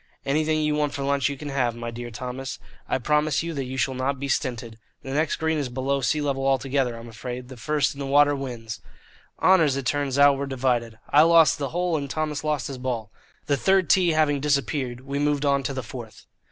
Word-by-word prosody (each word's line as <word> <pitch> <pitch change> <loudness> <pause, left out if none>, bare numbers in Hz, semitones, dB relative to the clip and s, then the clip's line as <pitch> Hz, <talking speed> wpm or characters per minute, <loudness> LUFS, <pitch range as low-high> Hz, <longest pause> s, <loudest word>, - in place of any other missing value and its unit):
"Anything 155 +2 +1
you 150 0 +1
want 150 -1 0
for 140 - -3
lunch 140 -1 +1
you 140 - -5
can 150 +1 -6
have, 125 -4 0
my 120 0 -5
dear 120 +1 -6
Thomas. 125 +3 -6 0.3
I - - +2
promise 150 +4 +1
you 165 0 -4
that 140 -3 -3
you 130 +1 -6
shall 130 +1 +1
not 130 +1 -2
be 140 - -3
stinted. 120 -4 -2 0.2
The 135 - -5
next 155 +3 +1
green 160 -1 0
is 140 -3 -2
below 135 +2 -1
sea 150 +3 +1
level 135 -2 -1
altogether, 135 -2 +1
I'm 115 +1 -10
afraid. 125 +2 -7
The 130 - -9
first 140 +4 0
in 140 - -12
the 140 - -3
water 145 +1 +4
wins." 120 -5 -6 0.6
Honours, 165 -7 +5
it 135 - -4
turned 140 0 0
out, 140 -1 +6
were 140 - -2
divided. 120 -4 -1
I 145 - +7
lost 165 -4 +5
the 140 -2 -2
hole, 175 0 0
and 140 -2 -4
Thomas 150 0 -2
lost 150 -4 -1
his 135 -2 -6
ball. 120 -4 -3 0.3
The 140 - +1
third 190 +3 +3
tee 180 -3 +4
having 150 -2 +2
disappeared, 135 -3 -1
we 140 +1 -4
moved 145 0 +1
on 140 -1 +3
to 135 - -3
the 130 -1 -4
fourth. 115 0 -10
140 Hz, 225 wpm, -25 LUFS, 125-150 Hz, 0.6 s, I